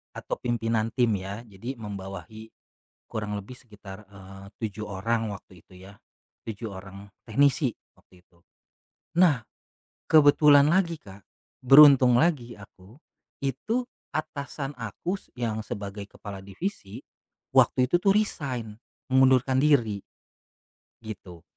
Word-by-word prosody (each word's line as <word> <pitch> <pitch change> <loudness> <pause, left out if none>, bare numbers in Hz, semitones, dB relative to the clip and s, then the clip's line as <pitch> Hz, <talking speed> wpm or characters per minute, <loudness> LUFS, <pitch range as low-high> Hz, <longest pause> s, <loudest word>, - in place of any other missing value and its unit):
Atau - - -5
pimpinan 115 -2 -1
tim 120 -5 +2
ya 100 +5 -7
jadi 115 +5 -8
membawahi, 105 +2 -8 0.6
kurang 105 -2 -3
lebih 105 +6 -10
sekitar, 105 -4 -13
eee, 95 0 -12 0.2
7 105 -1 -4
orang 110 +3 -1
waktu 95 -3 -12
itu - - -19
ya, 100 +1 -14 0.5
7 110 0 -6
orang 100 +1 -11 0.2
teknisi 135 +2 +2 0.2
waktu 90 -1 -23
itu, 85 -2 -31 0.8
nah 155 -10 +4 0.7
kebetulan 145 -1 +6
lagi, 170 -2 +1
Kak, 95 -4 -14 0.4
beruntung 135 -2 +8
lagi 145 -8 +1
aku, 100 +4 -16 0.4
itu 185 - -2 0.2
atasan 140 -2 -5
aku 120 - -4
s - - -22
yang 110 -2 -2
sebagai 100 -1 -6
kepala 100 -1 -10
divisi, 100 - -6 0.6
waktu 125 0 +4
itu - - +2
tuh 195 +3 +2
resign, 130 - -2 0.3
mengundurkan 130 0 +4
diri 125 -8 +2 1.0
gitu. 95 -6 -10
115 Hz, 115 wpm, -26 LUFS, 100-135 Hz, 1.0 s, beruntung